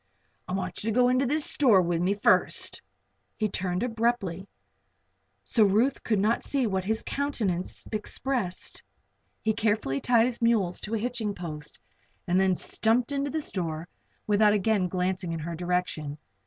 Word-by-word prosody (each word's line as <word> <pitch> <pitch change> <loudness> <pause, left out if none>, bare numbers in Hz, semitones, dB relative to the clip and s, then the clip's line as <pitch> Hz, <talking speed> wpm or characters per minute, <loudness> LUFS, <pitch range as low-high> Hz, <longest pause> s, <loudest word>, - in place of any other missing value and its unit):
I 180 - -4
want 185 -1 -3
you 225 - -1
to 220 - -1
go 250 0 +5
into 255 +1 +2
this 300 +3 +1
store 240 -9 +4
with 170 -2 +1
me 190 +3 +1
first." 205 - +2 0.6
He 215 - +1
turned 185 0 -2
away 245 - -1
abruptly, 220 -6 -1 1.0
so 225 - +3
that 200 - +4
Ruth 245 +7 +2
could 215 - +1
not 215 +4 +2
see 275 -3 0
what 190 -3 -1
his 220 +2 -1
countenance 220 -11 -2
expressed. 215 -1 -2 0.6
He 220 - +2
carefully 210 -12 0
tied 235 -2 +4
his 240 -1 -3
mules 220 -7 +2
to 215 +2 -3
a - - +1
hitching 220 -2 -2
post 155 -4 -7 0.5
and 180 +2 +2
then 190 -1 +3
stumped 230 +8 +1
into 280 0 -1
the 315 +2 -2
store 165 - -3 0.4
without 210 0 +4
again 205 -2 +2
glancing 180 -1 -2
in 165 - -3
her 170 +2 -4
direction. 175 -4 -2
205 Hz, 170 wpm, -27 LUFS, 180-235 Hz, 1.0 s, go